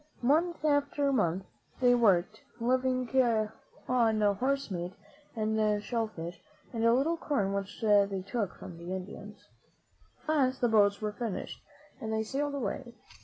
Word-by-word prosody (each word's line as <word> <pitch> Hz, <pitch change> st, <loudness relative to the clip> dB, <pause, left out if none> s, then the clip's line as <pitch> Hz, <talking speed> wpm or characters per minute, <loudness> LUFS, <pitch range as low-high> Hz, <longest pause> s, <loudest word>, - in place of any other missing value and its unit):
Month 315 Hz, +5 st, +2 dB
after 285 Hz, -1 st, +2 dB
month 190 Hz, -5 st, +1 dB, 0.3 s
they 245 Hz, -1 st, +5 dB
worked, 215 Hz, -3 st, +3 dB, 0.2 s
liv 255 Hz, +2 st, +2 dB
ing 255 Hz, -1 st, 0 dB, 0.8 s
on 230 Hz, -4 st, +3 dB, 0.2 s
horse 275 Hz, 0 st, 0 dB
meat 175 Hz, 0 st, -4 dB, 0.4 s
and 215 Hz, -1 st, +1 dB
shell 230 Hz, -1 st, -1 dB
fish 170 Hz, -4 st, -8 dB, 0.3 s
and 225 Hz, -1 st, -1 dB
a 230 Hz, -, +5 dB
little 285 Hz, +8 st, +2 dB
corn 205 Hz, -12 st, 0 dB
which 200 Hz, 0 st, -4 dB
they 200 Hz, -3 st, +3 dB
took 205 Hz, -3 st, -2 dB
from 180 Hz, -3 st, -10 dB
the 175 Hz, +2 st, -4 dB
Indians. 205 Hz, +2 st, -9 dB, 0.8 s
At -, -, -25 dB
last 265 Hz, -4 st, +2 dB
the 240 Hz, -, +3 dB
boats 205 Hz, -2 st, +4 dB
were 210 Hz, -1 st, -1 dB
finished 220 Hz, -2 st, -5 dB, 0.4 s
and 220 Hz, -, -3 dB
they 220 Hz, 0 st, 0 dB
sailed 285 Hz, +5 st, -2 dB
away. 240 Hz, 0 st, -4 dB
220 Hz, 150 wpm, -30 LUFS, 200-255 Hz, 0.8 s, they